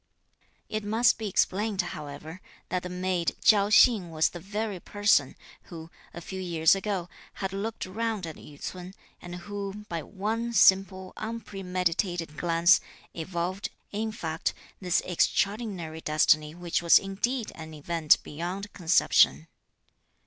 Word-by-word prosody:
It 215 0 -3
must 225 +4 +3
be 220 - -3
explained, 205 +2 0
however, 150 +4 -8 0.3
that 180 - -1
the 180 - -6
maid 180 -1 -1
Chi'ao 205 -2 +5
Hsing 215 -6 +5
was 160 -1 +2
the 175 - -9
very 205 +1 -4
person, 205 -9 +2 0.3
who, 165 -1 -10 0.2
a 170 - -9
few 190 +2 -6
years 165 -3 +3
ago, 195 -2 -2 0.3
had 195 -1 -4
looked 215 +3 -4
round 215 0 -3
at 160 -2 -7
Yü 145 -1 -14
ts'un 185 +1 -7 0.3
and 175 0 -8
who, 205 0 -6
by 170 -1 -3
one 220 +7 -3
simple, 190 -3 +4
unpremeditated 180 -6 -2
glance, 170 +4 +4 0.3
evolved, 175 +3 -3 0.2
in 220 +2 -2
fact, 160 -6 -3 0.2
this 180 -2 +1
extraordinary 185 -3 -1
destiny 155 0 +2
which 175 -1 -2
was 170 -1 +7
indeed 215 +5 -2
an 160 -1 -9
event 155 +1 +3
beyond 180 +6 -5
conception. 160 - +3
185 Hz, 135 wpm, -27 LUFS, 165-205 Hz, 0.3 s, was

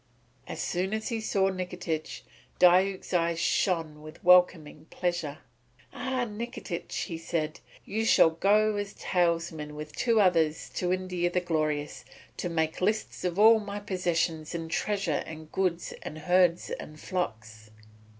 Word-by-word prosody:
As - - -6
soon 185 +4 -1
as 220 +2 -3
he 230 -2 -2
saw 195 -3 +1
Nikitich, 180 -4 -4 0.4
Diuk's 185 +2 +4
eyes 170 -1 +2
shone 165 -4 0
with 155 0 -12
welcoming 175 -4 +4
pleasure. 175 -5 -2 0.6
"Ah, 255 0 -2
Nikitich," 225 -4 -5
he 165 -2 -5
said, 160 -2 -3 0.3
"you 220 +3 -2
shall 165 -6 +5
go 210 +5 +3
as 205 0 -4
talesman 165 -4 -1
with 150 0 -8
two 230 -3 +2
others 165 -5 +2
to 180 -1 -1
India 180 -1 -1
the 180 - +1
Glorious, 155 -4 -2 0.3
to 175 - -3
make 160 0 -1
lists 215 +4 -1
of 180 0 -1
all 220 +2 +7
my 205 -1 -5
possessions 175 -5 -1
in 165 -1 -4
treasure 195 -4 0
and 155 0 -9
goods 180 -3 -1
and 155 - -7
herds 175 +2 +2
and 155 0 -7
flocks. 110 - -4
175 Hz, 140 wpm, -28 LUFS, 160-195 Hz, 0.6 s, all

